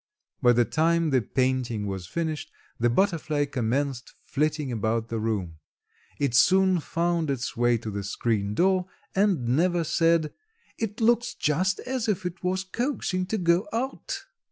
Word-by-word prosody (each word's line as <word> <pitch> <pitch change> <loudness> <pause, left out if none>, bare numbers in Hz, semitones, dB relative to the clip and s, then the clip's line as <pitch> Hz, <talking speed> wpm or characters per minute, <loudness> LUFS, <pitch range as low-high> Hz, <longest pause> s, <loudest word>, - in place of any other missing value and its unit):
By 120 -2 +6
the 120 0 +3
time 165 +2 +2
the 130 -2 +3
painting 125 -4 -1
was 95 -3 -4
finished 155 - -3 0.3
the 120 +1 +3
butterfly 155 -1 +1
commenced 130 0 -2
flitting 150 -1 -1
about 115 0 -1
the 115 - -2
room. 100 -8 -2 0.6
It 140 -4 0
soon 185 +8 +5
found 170 0 -1
its 130 -2 -2
way 120 0 +3
to 110 -1 -6
the 100 0 -4
screen 105 0 -1
door 185 - +2 0.3
and 190 - +2
Neva 170 +5 +2
said, 165 -1 +2 0.5
"It 225 0 -3
looks 240 +1 +2
just 185 +6 0
as 255 -3 -2
if 195 -4 -1
it 180 0 -5
was 185 +1 0
coaxing 190 -4 -2
to 220 - -1
go 175 +1 +2
out." 255 +5 -3
155 Hz, 155 wpm, -26 LUFS, 120-185 Hz, 0.6 s, By